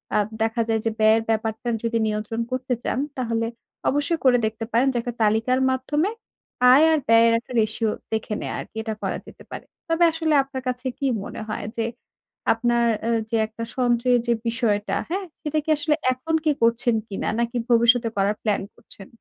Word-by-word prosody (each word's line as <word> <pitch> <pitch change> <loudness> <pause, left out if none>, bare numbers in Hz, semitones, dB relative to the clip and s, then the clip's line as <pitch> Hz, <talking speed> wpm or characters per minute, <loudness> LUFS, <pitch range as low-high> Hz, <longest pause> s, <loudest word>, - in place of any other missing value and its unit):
আ - - +4 0.3
দেখা 225 +1 0
যায় 225 -1 +1
যে 225 - +1
ব্যয়ের 220 +1 +5
ব্যাপারটা 220 +1 -1 0.2
যদি 230 0 0
নিয়ন্ত্রণ 215 +2 -2
করতে 255 0 -1
চান, - - -1 0.2
তাহলে 230 -2 -1 0.4
অবশ্যই 290 +4 0
করে 250 -1 +6
দেখতে 220 +1 -3
পারেন। 245 +4 +3
যে - - -1
একটা 240 +1 -5
তালিকার 225 +4 +2
মাধ্যমে, 295 +7 0 0.6
আয় 285 +5 +7
আর 315 - +3
ব্যয়ের 230 0 +6
একটা 240 - -16
রেশিও 220 0 0 0.2
দেখে 220 0 -2
নেয়া - - -4
আরকি। - - -9
এটা 220 -1 -3
করা - - -1
যেতে - - -13
পারে। - - -7 0.2
তবে 330 +1 +2
আসলে 320 -1 0
আপনার 270 -1 -6
কাছে 250 +1 -2
কি 280 - -3 0.2
মনে - - -7
হয় 215 - -4
যে 225 - 0 0.7
আপনার 235 +1 +1 0.2
অ্যা 230 - 0 0.2
যে 230 - +1
একটা 220 +1 -7
সঞ্চয়ের 245 0 +3
যে 235 - +4
বিষয়টা, 225 -3 0
হ্যাঁ? 380 +3 -2 0.2
সেটা 310 -1 -2
কি 315 - -7
আসলে 300 +1 +1 0.2
এখন 290 +6 -2
কি 310 - +4
করছেন 235 0 +3
কিনা? 200 - -4
নাকি 235 +1 -1
ভবিষ্যতে 235 0 +4
করার 200 +2 +2
প্ল্যান 210 -2 +1
করছেন? 195 - -14
235 Hz, 185 wpm, -23 LUFS, 225-260 Hz, 0.7 s, আয়